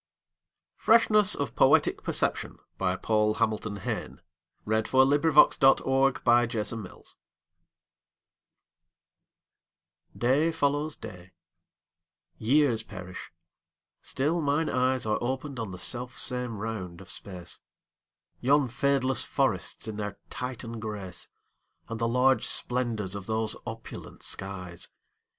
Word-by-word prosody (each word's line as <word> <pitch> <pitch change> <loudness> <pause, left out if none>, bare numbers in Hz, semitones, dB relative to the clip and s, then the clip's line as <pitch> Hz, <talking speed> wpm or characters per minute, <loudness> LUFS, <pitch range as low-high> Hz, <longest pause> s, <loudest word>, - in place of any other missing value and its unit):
Freshness 215 -3 +5
of - - -4
Poetic - - +4
Perception - - -1 0.2
Paul 105 +3 +1
Hamilton 110 -2 -1
Hayne 95 - -5 0.5
(1830–1886) 130 - +2 3.0
DAY 140 +7 +2
follows 145 0 -1
day; 90 0 -11 1.1
years 125 -1 +2
perish; 90 -4 -9 0.7
still 155 +6 -1
mine 145 +2 0
eyesAre 125 -3 +1
opened 130 +2 -3
on 110 -3 -4
the 95 - -8
self 125 +5 -2
same 125 -3 -1
round 100 -5 -5
of 95 - -13
space; 90 -3 -5 0.8
Yon 140 +2 +3
fadeless 130 +1 +1
forests 115 -8 -1
in 110 -1 -5
their 105 -2 -5
Titan 120 -2 -5
grace, 105 -5 -7 0.6
And 115 -1 -5
the 115 - +1
large 125 +2 +3
splendors 115 -6 +1
of 100 -2 -7
those 110 0 -1
opulent 115 -1 -9
skies. 90 -3 -4
120 Hz, 90 wpm, -28 LUFS, 105-135 Hz, 3.0 s, Freshness